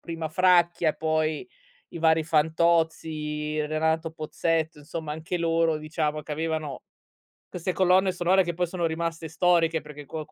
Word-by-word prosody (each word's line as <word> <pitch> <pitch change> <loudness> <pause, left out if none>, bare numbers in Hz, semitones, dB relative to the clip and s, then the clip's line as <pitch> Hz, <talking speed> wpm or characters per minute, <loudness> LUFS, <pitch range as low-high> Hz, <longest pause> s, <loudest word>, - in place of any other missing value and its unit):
prima 165 -1 -5
Fracchia, 175 -1 +3
poi 155 - -1 0.4
i - - -8
vari 160 0 +3
Fantozzi, 155 -1 0
Renato 160 +1 0
Pozzetto, 160 0 -1
insomma 155 +1 -6
anche 160 +3 -4
loro 165 -1 +2
diciamo 155 -1 -2
che 150 - -6
avevano 155 -2 -3 0.6
queste 180 +1 -3
colonne 185 +1 +3
sonore 180 +1 +3
che 175 - -3
poi 180 +1 0
sono 170 -1 -1
rimaste 165 0 -3
storiche 165 -1 +2
perché 150 -1 -11
qualc 155 +2 -6
160 Hz, 140 wpm, -26 LUFS, 155-170 Hz, 0.6 s, Fracchia